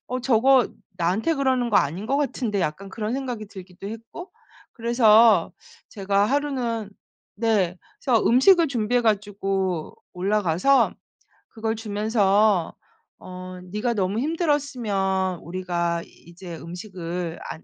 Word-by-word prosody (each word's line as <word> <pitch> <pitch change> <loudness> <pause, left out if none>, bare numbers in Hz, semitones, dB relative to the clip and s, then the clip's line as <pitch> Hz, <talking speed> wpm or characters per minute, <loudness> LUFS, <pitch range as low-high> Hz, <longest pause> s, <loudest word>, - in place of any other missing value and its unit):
'어 255 +1 -2
저거 255 0 +4 0.3
나한테 185 - 0
그러는 260 -4 +1
거 210 - +4
아닌 175 +9 0
것 275 - +1
같은데.' 245 -8 -1
약간 175 +4 -3
그런 215 +3 -4
생각이 250 -5 -4
들기도 190 -1 -11
했고 230 - -9 0.4
그래서 230 -2 +4 0.4
제가 200 -1 0
하루는 245 -6 -1 0.5
네 200 -5 +1 0.3
그래서 235 -5 +3
음식을 330 +7 +5
준비해 245 -1 +1
가지고 195 -5 -1 0.2
올라가서 195 +6 +2 0.6
그걸 220 0 -3
주면서 210 -3 +1 0.5
어 185 0 -9
"네가 210 +4 -1
너무 195 +1 0
힘들었으면 240 - -1
우리가 170 -1 -2
이제 170 0 -11
음식을 175 -1 -6
안 160 - -8
210 Hz, 260 characters per minute, -24 LUFS, 185-240 Hz, 0.6 s, 음식을